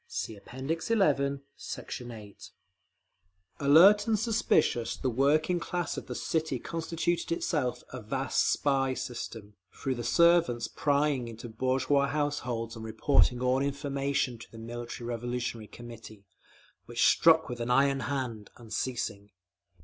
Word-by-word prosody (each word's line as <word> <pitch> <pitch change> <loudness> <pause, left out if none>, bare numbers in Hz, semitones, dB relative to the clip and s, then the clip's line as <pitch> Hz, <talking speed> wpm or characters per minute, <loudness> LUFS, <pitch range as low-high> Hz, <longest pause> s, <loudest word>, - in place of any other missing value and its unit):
(See 110 - -4
App. 100 - -17
XI, 140 - +1 0.2
Sect. - - -8
8)… 110 -4 -10 1.1
Alert 180 +9 +7
and 220 -1 +3
suspicious, 205 - +1
the 130 - -1
working 155 +8 +2
class 175 0 -3
of - - -7
the - - -5
city 160 -4 -1
constituted 165 +5 -2
itself 150 -6 -1
a 125 - -6
vast 135 +5 0
spy 135 -2 +1
system, 115 -5 -6 0.2
through 135 - -3
the 120 -1 -5
servants 170 -4 +3
prying 145 -3 +1
into 115 +1 -8
bourgeois 130 +4 +1
households, 125 -6 -2
and 110 - -8
reporting 120 +2 +2
all 125 +1 +2
information 140 -3 -1
to - - -12
the 115 - -12
Military 120 +1 -7
Revolutionary 120 -1 -3
Committee, 110 -4 -11 0.6
which 120 0 +1
struck 160 -1 +5
with 120 -1 -6
an 120 +1 -3
iron 135 +2 +3
hand, 125 -7 -3
unceasing. 110 -3 -4
130 Hz, 130 wpm, -29 LUFS, 120-145 Hz, 1.1 s, Alert